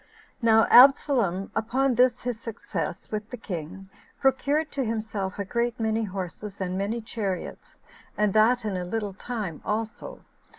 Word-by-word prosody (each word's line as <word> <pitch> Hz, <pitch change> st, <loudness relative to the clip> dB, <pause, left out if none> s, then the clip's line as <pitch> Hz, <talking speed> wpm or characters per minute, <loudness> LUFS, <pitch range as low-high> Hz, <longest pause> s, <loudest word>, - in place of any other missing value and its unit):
1. 230 Hz, -3 st, +3 dB
Now 225 Hz, 0 st, +5 dB
Absalom, 245 Hz, -8 st, +5 dB
upon 255 Hz, +4 st, +1 dB
this 250 Hz, 0 st, +3 dB
his 245 Hz, -2 st, -3 dB
success 230 Hz, -, -5 dB
with 215 Hz, 0 st, -4 dB
the 250 Hz, -, -6 dB
king, 190 Hz, -2 st, -7 dB, 0.3 s
procured 285 Hz, +3 st, +1 dB
to 275 Hz, -, -1 dB
himself 215 Hz, -4 st, -3 dB
a 200 Hz, -, -3 dB
great 235 Hz, +3 st, -1 dB
many 220 Hz, 0 st, 0 dB
horses, 195 Hz, +1 st, -6 dB
and 185 Hz, -1 st, -2 dB
many 205 Hz, +5 st, -2 dB
chariots, 205 Hz, -5 st, -5 dB, 0.4 s
and 210 Hz, -2 st, +2 dB
that 225 Hz, +2 st, +4 dB
in 205 Hz, -3 st, -2 dB
a 180 Hz, -, -2 dB
little 205 Hz, +2 st, -3 dB
time 205 Hz, -6 st, -5 dB
also. 225 Hz, -, -4 dB
220 Hz, 155 wpm, -26 LUFS, 195-245 Hz, 0.4 s, Now